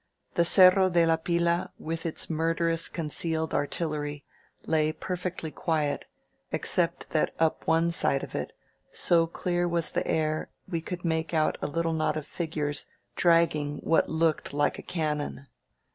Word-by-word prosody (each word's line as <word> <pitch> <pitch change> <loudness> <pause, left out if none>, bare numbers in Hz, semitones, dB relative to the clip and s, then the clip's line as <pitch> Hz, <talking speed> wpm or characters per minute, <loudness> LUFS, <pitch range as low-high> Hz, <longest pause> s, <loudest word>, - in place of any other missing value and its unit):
The 170 - +3
Cerro 185 +1 +7
de 170 -1 +4
la 165 0 +3
Pila, 170 +1 0
with 165 +1 -4
its 160 - -1
murderous 165 +1 +1
concealed 160 0 -2
artillery, 145 -1 -2 0.4
lay 155 -1 +2
perfectly 180 -1 -4
quiet, 155 -3 -1 0.5
except - - 0
that - - +1
up 160 -1 0
one 165 +1 +3
side 140 -4 +2
of - - -8
it, - - -3 0.4
so 165 -1 +2
clear 175 +1 -1
was 170 -1 0
the - - -1
air, 155 -1 0 0.2
we 170 -3 -2
could 175 +2 -6
make 160 0 -1
out 155 -1 +1
a - - -1
little 165 +2 -1
knot 155 -1 0
of 155 - -5
figures 150 -3 -2 0.3
dragging 165 -4 +2
what 165 - +2
looked 160 -3 0
like 145 0 +1
a - - -5
cannon. 150 -4 -3
165 Hz, 150 wpm, -28 LUFS, 155-170 Hz, 0.5 s, Cerro